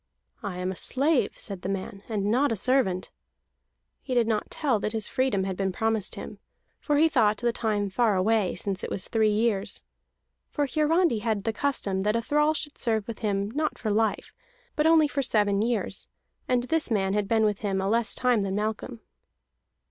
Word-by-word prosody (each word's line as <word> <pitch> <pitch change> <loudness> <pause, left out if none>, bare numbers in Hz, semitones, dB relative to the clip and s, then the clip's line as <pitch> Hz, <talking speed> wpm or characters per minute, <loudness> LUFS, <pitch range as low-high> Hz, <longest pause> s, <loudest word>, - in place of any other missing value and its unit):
"I 200 -4 -5
am 180 +1 -2
a - - -6
slave," 275 - 0
said 195 -4 -2
the 185 - -4
man, 195 0 -4
"and 205 -3 -1
not 270 +4 +2
a - - +1
servant." 205 -5 +1 0.9
He 255 - -4
did 240 -2 +4
not 220 -1 -1
tell 265 -8 0
that 215 +2 -2
his 220 -2 -1
freedom 255 -7 0
had 190 -1 -3
been 190 0 -1
promised 220 +1 -1
him, - - -8 0.4
for 295 -1 0
he 320 +2 +5
thought 220 -9 +2
that 240 +1 0
time 210 -3 -1
far 215 +1 +1
away, 205 +1 +1
since 195 +2 -3
it - - -3
was 190 - -3
three 220 -2 +2
years. 210 -2 0 0.7
For 290 - 0
Hiarandi 310 -1 +2
had 215 -2 -1
the 225 0 -1
custom 210 -8 -1
that 210 +2 +1
a 230 - +1
thrall 300 +4 +2
should 295 0 -4
serve 220 -4 0
with 230 - -6
him 200 -1 -1
not 305 +4 -1
for 215 - -2
life, 220 0 0 0.4
but 305 +1 +2
for - - +5
only 320 -2 +5
seven 210 -8 +1
years, 220 -4 -1 0.4
and 245 -1 +2
this 320 +3 +1
man 195 -4 +1
had 205 -1 0
been 220 0 +3
with 210 -1 0
him 195 -3 -1
a 190 - -1
less 230 +2 +1
time 250 -4 +2
than 195 -1 -2
Malcolm. 210 - -3
220 Hz, 200 wpm, -26 LUFS, 200-255 Hz, 0.9 s, he